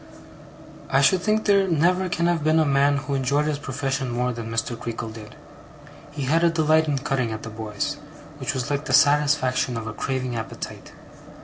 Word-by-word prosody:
I 135 - +3
should 170 +6 +4
think 215 +2 +1
there 200 -2 +4
never 180 +3 +2
can 170 0 0
have 170 -3 +1
been 155 +1 +3
a 160 - +4
man 140 0 +3
who 140 0 -4
enjoyed 140 +2 +1
his 150 -2 -1
profession 135 -1 -3
more 125 +1 -1
than 115 -1 -6
Mr. 115 +1 -2
Creakle 115 -1 -5
did. 110 -1 -11 0.7
He 145 -1 -5
had 160 +6 +2
a 170 - +5
delight 160 -1 +2
in 145 -2 0
cutting 135 -4 -1
at 110 - -6
the 115 - -6
boys, 110 +7 -4 0.4
which 135 +2 -2
was 130 +2 -3
like 145 +1 -1
the 130 - -2
satisfaction 140 -3 +3
of 115 - -5
a 115 - -5
craving 130 +1 -3
appetite. 110 -1 -7
140 Hz, 195 wpm, -24 LUFS, 125-155 Hz, 0.7 s, a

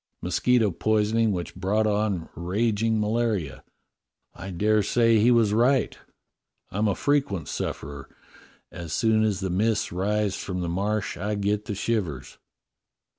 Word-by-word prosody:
Mosquito 110 +4 +2
poisoning 110 +4 +1
which 90 -3 -4
brought 100 +4 0
on 105 -5 0
rag 105 +5 -1
ing 115 -1 +1
malaria. 105 - -1 0.7
I 95 - -8
dare 105 +4 +2
say 115 +2 +3
he 115 +4 +4
was 115 -4 +4
right: 125 +2 +2 0.8
I'm 105 +3 0
a 100 - +1
frequent 135 - 0
sufferer. 70 0 -5 0.6
As 85 -3 -7
soon 110 +4 +2
as 105 -3 0
the 95 -1 -2
mists 105 +4 0
rise 100 +2 0
from 90 -2 -4
the 85 - -2
Marsh 100 +3 -2
I 105 +4 -2
get 100 +1 -1
the 105 - -4
shivers." 95 - -3
105 Hz, 140 wpm, -25 LUFS, 95-110 Hz, 0.8 s, he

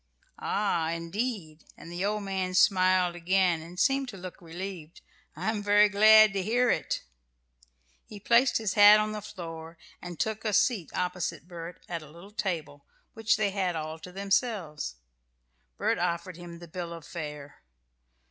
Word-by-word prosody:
"Ah, 175 -6 0
indeed!" 170 -1 -4
And 170 - -11
the 175 +2 -3
old 210 +1 -1
man 190 -2 -2
smiled 185 -2 +4
again, 175 -1 +1
and 175 +3 -10
seemed 270 +5 +2
to 200 - -9
look 185 -1 -9
relieved. 175 -1 -8 0.3
"I'm 220 -1 -2
very 205 +1 +5
glad 215 +1 +7
to 195 - -1
hear 240 +5 +2
it." - - -2 1.0
He 210 - -10
placed 235 +5 +4
his 215 -4 -2
hat 205 +1 +8
on 215 0 -1
the 210 0 -5
floor 165 -5 -9 0.2
and 175 -2 -8
took 220 0 -2
a 215 -2 -1
seat 200 - +2
opposite 180 -2 -3
Bert 170 -1 -9
at 170 -1 -4
a 155 - -13
little 170 +6 -14
table, 165 -9 -4 0.3
which 225 -1 +1
they 210 -2 +1
had 190 -3 -1
all 155 0 -5
to 180 - -10
themselves. 195 - -1 0.8
Bert - - 0
offered 170 +1 -2
him 170 0 -10
the 170 0 -11
bill 170 0 -6
of 165 -2 -10
fare. 150 - -8
185 Hz, 160 wpm, -28 LUFS, 170-210 Hz, 1.0 s, hat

